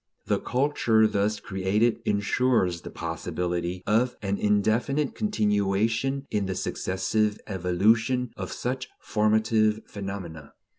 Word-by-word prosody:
The - - +1
culture 125 -5 +2
thus 105 0 +1
created 105 +5 0
ensures 105 -3 +1
the - - -8
possibility 90 0 -3
of 120 +4 +2
an 100 0 -1
indefinite 110 +8 +1
continuation 115 - 0
in 105 -2 0
the 95 - -2
successive 100 +3 -1
evolution 110 +7 +1
of - - -5
such 130 +1 -3
formative 110 0 +2
phenomena. 95 -7 -7
105 Hz, 105 wpm, -26 LUFS, 95-115 Hz, -, culture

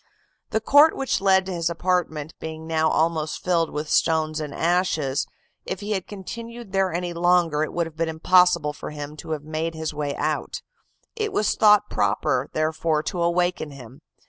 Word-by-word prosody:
The 220 - 0
court 290 +7 +6
which 270 -6 -1
led 190 -1 +4
to 190 - -4
his 170 -1 -1
apartment 170 -3 -1
being 160 0 -7
now 160 -1 +1
almost 160 -1 0
filled 170 -3 +1
with 150 +1 -4
stones 155 0 +1
and 150 -2 -5
ashes, 160 -4 0 0.4
if 190 - -5
he 205 +1 -4
had 190 -3 -2
continued 230 +2 -8
there 195 -1 +1
any 175 +1 -3
longer 170 -3 +2
it 155 - -1
would 170 -1 -1
have 160 -1 -11
been 165 0 0
impossible 170 -1 +3
for - - -7
him 150 0 -7
to - - -9
have 155 -2 -3
made 160 +2 -3
his 160 -1 -4
way 145 -1 -3
out; - - -2 0.5
it 430 -2 -2
was 215 - +1
thought 210 -1 +5
proper, 105 +6 0
therefore, 155 0 0
to 180 0 -3
awaken 175 -1 0
him. 135 0 -12
165 Hz, 180 wpm, -24 LUFS, 155-185 Hz, 0.5 s, court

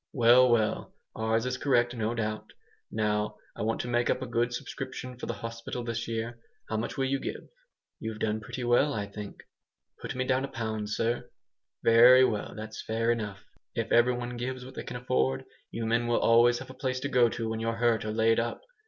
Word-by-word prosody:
"Well, 125 -1 +6
well! 110 -3 +1 0.2
Ours 110 +1 0
is 125 0 -1
correct, 120 -3 +2
no 115 0 -1
doubt. 110 -2 -3 0.4
Now 105 -1 0 0.2
I - - -6
want 110 +2 0
to - - -6
make 120 0 +1
up - - +2
a - - -3
good 120 0 0
subscription 125 +1 -6
for 125 - -7
the - - -1
hospital 115 +1 -5
this 115 0 -3
year. 115 +1 -3 0.3
How 110 - -1
much 115 - -3
will 135 - +1
you 135 +1 0
give? - - -6 0.5
You've 110 -1 -5
done 110 0 -1
pretty 115 +3 -6
well, 120 +4 +3
I 105 -1 -2
think." 100 0 -9 0.6
"Put - - -5
me 130 0 -1
down 130 0 +1
a - - -2
pound, 110 -3 -4
sir." 115 +3 -1 0.5
"Very 125 +3 +8
well, 105 -4 -2
that's 110 0 -7
fair 115 +1 0
enough. 105 -4 -4 0.3
If 115 - -2
every 120 +1 +5
one 120 0 -5
gives 125 +1 -4
what 130 - -10
they - - -6
can 125 - -6
afford, 65 - 0 0.2
you 115 0 -4
men 115 +1 +1
will 120 - +2
always 120 +1 +5
have - - -8
a - - -10
place 130 -1 -2
to 140 - -1
go 125 -4 +4
to 115 0 -3
when 110 0 -2
you're 115 0 -1
hurt 115 -1 +2
or 110 - -3
laid 115 +1 +3
up. 115 0 -2
115 Hz, 215 wpm, -29 LUFS, 110-125 Hz, 0.6 s, Very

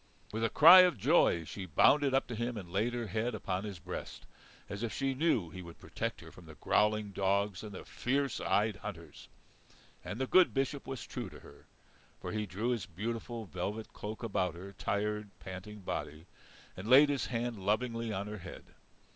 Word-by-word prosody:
With 110 +1 -2
a 115 - +2
cry 170 +5 +10
of 180 -7 +5
joy 85 -3 +3
she 95 +3 -7
bounded 140 - +4
up 135 - +2
to 120 - -6
him 120 +1 -2
and 90 -4 -8
laid 110 +6 0
her 120 -1 -2
head 110 +4 -2
upon 95 0 -3
his 100 -3 -6
breast, 80 - -7 0.4
as 100 +1 -6
if 115 -2 -2
she 135 -1 -1
knew 130 - +1
he 95 - -8
would 85 -2 -11
protect - - -4
her - - -12
from - - -15
the - - -11
growling 105 -1 +1
dogs 100 0 0
and 105 - -8
the 95 - -9
fierce 135 0 -1
eyed 105 -1 +1
hunters. 85 -8 -9 0.7
And 110 - -6
the 130 - +1
good 185 +4 +5
Bishop 135 +1 -1
was 135 -3 -5
true - - -5
to - - -13
her. - - -16 0.5
For - - -5
he 105 -1 -2
drew 100 +7 -2
his 120 -5 -1
beautiful 115 +5 -4
velvet 100 +4 -5
cloak 110 +3 -7
about 95 -6 -1
her 95 +3 -9
tired, 105 +1 -2
panting 95 +2 -8
body, 80 -3 -5 0.5
and 100 +5 -7
laid 140 +3 +8
his 140 -2 -1
hand 115 -4 -3
lovingly 115 +2 0
on 100 0 -3
her 105 0 -6
head. - - -9
105 Hz, 195 wpm, -32 LUFS, 95-120 Hz, 0.7 s, cry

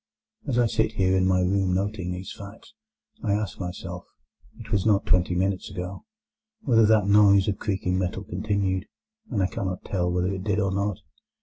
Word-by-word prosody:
As 130 -4 0
I 120 - +4
sit 110 -1 0
here 95 -2 +2
in 95 0 +3
my 90 -1 +3
room 95 0 +1
noting 95 -1 -2
these 90 +1 -6
facts, 100 - -12 0.5
I 105 -3 +1
ask 105 -2 -2
myself 90 -1 -6 0.5
(it - - -11
was 100 -2 +2
not 105 -3 +2
twenty 90 0 +2
minutes 95 +1 -1
ago) 90 - -6 0.6
whether 115 -5 +4
that 110 -2 +4
noise 100 -1 +5
of 100 - -1
creaking 95 -3 -1
metal 95 +1 -2
continued, 95 -1 -1 0.4
and 105 -7 0
I - - +3
cannot 95 -1 -4
tell 90 -2 -1
whether 90 +2 0
it 95 -1 -5
did 100 -1 0
or 100 -2 +1
not. 100 -1 -1
95 Hz, 185 wpm, -25 LUFS, 90-105 Hz, 0.6 s, noise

